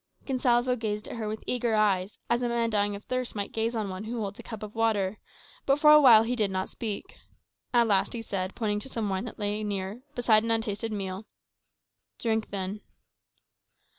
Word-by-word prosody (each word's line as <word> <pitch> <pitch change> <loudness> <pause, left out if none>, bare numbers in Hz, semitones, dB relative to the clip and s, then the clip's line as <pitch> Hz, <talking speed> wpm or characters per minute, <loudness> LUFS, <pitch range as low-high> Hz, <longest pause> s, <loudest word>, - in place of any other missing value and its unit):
Gonsalvo 250 -2 +2
gazed 210 -2 -3
at - - -6
her 220 -2 -3
with 215 +1 -5
eager 240 -2 0
eyes, 200 -2 +1
as 240 +1 +1
a 245 - 0
man 235 -1 0
dying 205 -1 +1
of 200 - -9
thirst 255 -2 -3
might 200 -1 -3
gaze 225 +1 -1
on 215 -2 -1
one 190 +2 -6
who 235 +2 -4
holds 200 -1 -4
a - - -5
cup 220 -2 -8
of 210 0 -7
water; 215 -3 0 0.5
but 275 0 +4
for 300 0 +6
a 300 0 +9
while 230 -5 +8
he 240 +2 -1
did 215 -4 +1
not 190 0 -2
speak. 215 -4 -6 0.5
At 240 -1 +4
last 200 -4 +2
he 230 -1 -5
said, 190 -3 -3
pointing 210 -3 -1
to 240 - -8
some 225 -5 -2
wine 190 +4 -2
that 240 - -8
lay 210 0 -2
near, 200 +2 -3
beside 230 -3 +4
an 230 - -3
untasted 225 -1 -1
meal, 195 0 -4 0.9
"Drink, 220 -2 -1
then." 200 +1 -4
220 Hz, 205 wpm, -28 LUFS, 205-235 Hz, 0.9 s, a